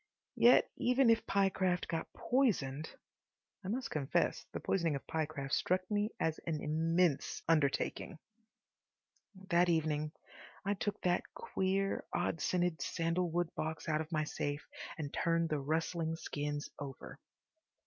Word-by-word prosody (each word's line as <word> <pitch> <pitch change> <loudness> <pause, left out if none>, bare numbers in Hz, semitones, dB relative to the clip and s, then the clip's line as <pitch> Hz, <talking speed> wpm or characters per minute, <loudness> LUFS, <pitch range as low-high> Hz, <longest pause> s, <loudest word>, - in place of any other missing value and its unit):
Yet 245 - +7
even 250 -1 +4
if 225 0 +1
Pyecraft 190 -2 +2
got 165 - -3
poisoned— 160 - +1 0.7
I - - -6
must 250 +6 -2
confess 140 -3 0
the - - -4
poisoning 170 -6 +1
of 140 - -6
Pyecraft 150 -4 -3
struck 185 +1 +2
me 210 +1 +1
as 160 -1 0
an 155 -2 0
immense 165 +1 +1
undertaking. 155 +2 +1 1.3
That 175 0 +4
evening 155 -2 +1 0.5
I 200 - +2
took 205 +1 -2
that 180 0 0
queer, 195 - 0
odd 165 - -1
scented 175 -2 +1
sandalwood 170 0 0
box 160 +1 -4
out 155 -1 +1
of 160 +2 -7
my 155 -1 +1
safe 145 -1 -3 0.3
and 145 -3 -4
turned 165 -1 +1
the 150 - 0
rustling 160 +3 -1
skins 145 -2 -3
over. 140 -2 -8
165 Hz, 130 wpm, -34 LUFS, 155-185 Hz, 1.3 s, Yet